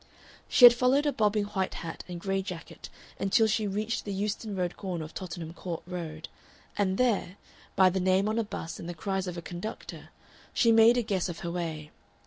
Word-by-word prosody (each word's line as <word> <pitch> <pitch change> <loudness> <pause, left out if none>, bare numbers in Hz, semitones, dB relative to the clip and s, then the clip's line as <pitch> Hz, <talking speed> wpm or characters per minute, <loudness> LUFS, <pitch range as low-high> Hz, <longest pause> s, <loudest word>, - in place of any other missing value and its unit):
She 250 - +8
had 240 - +11
followed 255 +4 +2
a 290 - +3
bobbing 210 -1 +2
white 195 -2 -2
hat 165 -2 -6
and 175 -1 -6
gray 195 +2 -1
jacket 180 -3 -8 0.3
until 205 +3 +3
she 215 -1 +1
reached 215 +3 -2
the 205 - -5
Euston 205 +1 -3
Road 180 -2 -2
corner 180 -5 -4
of 155 - -12
Tottenham 165 -3 -6
Court 175 -2 -6
Road, 165 -3 -6 0.5
and 190 -2 0
there, 215 -6 +1 0.4
by 190 -2 +5
the 190 - -1
name 190 +2 +2
on 220 +2 0
a - - +1
bus 165 -5 -6
and 170 - -7
the 175 - -5
cries 190 +3 -2
of 180 -1 -5
a 170 - -6
conductor, 175 +6 -7 0.5
she 230 - +4
made 225 +2 +6
a 245 - +2
guess 190 -4 -1
of 165 - -6
her 170 - -3
way. 160 -3 -4
190 Hz, 205 wpm, -29 LUFS, 175-215 Hz, 0.5 s, had